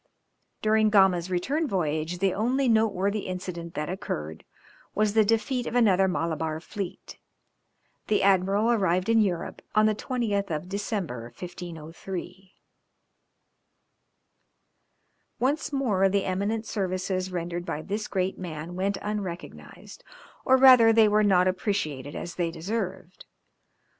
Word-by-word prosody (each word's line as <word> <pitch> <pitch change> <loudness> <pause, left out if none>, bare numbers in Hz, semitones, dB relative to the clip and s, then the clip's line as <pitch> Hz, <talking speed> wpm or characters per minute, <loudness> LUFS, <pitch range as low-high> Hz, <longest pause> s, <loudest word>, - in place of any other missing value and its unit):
During 215 0 +3
Gama's 190 -4 +4
return 275 - -1
voyage 160 - -1
the 195 +1 +1
only 255 +6 +1
noteworthy 210 -3 +1
incident 180 -2 -6
that 150 0 -2
occurred 80 - -5 0.5
was 210 -1 +2
the 220 0 +5
defeat 225 +4 0
of 235 - -4
another 195 -6 +4
Malabar 160 -3 -2
fleet. 190 +2 -7 0.9
The 210 - +2
admiral 195 +3 +3
arrived 185 -3 +1
in 225 -1 +5
Europe 180 -5 -2
on 215 0 +5
the 215 - +3
20th 210 -4 -2
of 155 +2 -3
December, 195 - -3
1503. 180 +2 -8 2.8
Once 285 +5 0
more 215 -9 +2
the 200 0 0
eminent 205 +4 -1
services 185 -2 -2
rendered 175 0 -3
by 155 -3 -4
this 210 +2 -3
great 190 -1 -2
man 170 -1 -6
went 195 +2 -1
unrecognised, 200 -5 -7 0.4
or 260 - +5
rather 255 -4 +8
they 225 -1 +5
were 210 +1 +3
not 185 -3 +4
appreciated 155 - -2
as 175 - -5
they 175 -2 -1
deserved. 185 +1 -5
190 Hz, 125 wpm, -26 LUFS, 175-215 Hz, 2.8 s, rather